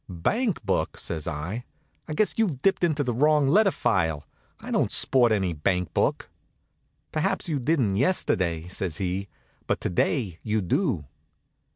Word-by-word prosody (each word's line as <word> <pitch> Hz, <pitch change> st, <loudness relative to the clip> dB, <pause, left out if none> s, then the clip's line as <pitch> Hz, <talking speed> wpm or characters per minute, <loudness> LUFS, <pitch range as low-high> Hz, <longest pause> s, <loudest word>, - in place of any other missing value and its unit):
"Bank 180 Hz, -, -1 dB
book!" 95 Hz, -, 0 dB
says 80 Hz, -1 st, -4 dB
I. 85 Hz, +9 st, -4 dB, 0.4 s
"I 155 Hz, -, -4 dB
guess 215 Hz, -, +2 dB
you've 175 Hz, -, 0 dB
dipped 195 Hz, -2 st, +2 dB
into 155 Hz, -4 st, +2 dB
the 125 Hz, -2 st, -1 dB
wrong 150 Hz, +3 st, +3 dB
letter 200 Hz, +8 st, +5 dB
file. 80 Hz, -, 0 dB, 0.3 s
I -, -, -8 dB
don't -, -, +1 dB
sport 120 Hz, -3 st, +4 dB
any 95 Hz, -5 st, +1 dB
bank 90 Hz, +4 st, -1 dB
book." -, -, 0 dB, 0.8 s
"Perhaps 185 Hz, +5 st, -1 dB
you 150 Hz, -4 st, -1 dB
didn't 125 Hz, -8 st, +1 dB
yesterday," 90 Hz, -, +1 dB
says 90 Hz, -3 st, -4 dB
he, 95 Hz, +1 st, -2 dB, 0.4 s
"but -, -, 0 dB
to -, -, -2 dB
day 90 Hz, -, 0 dB
you 110 Hz, -1 st, 0 dB
do." 95 Hz, -, 0 dB
110 Hz, 155 wpm, -26 LUFS, -, 0.8 s, letter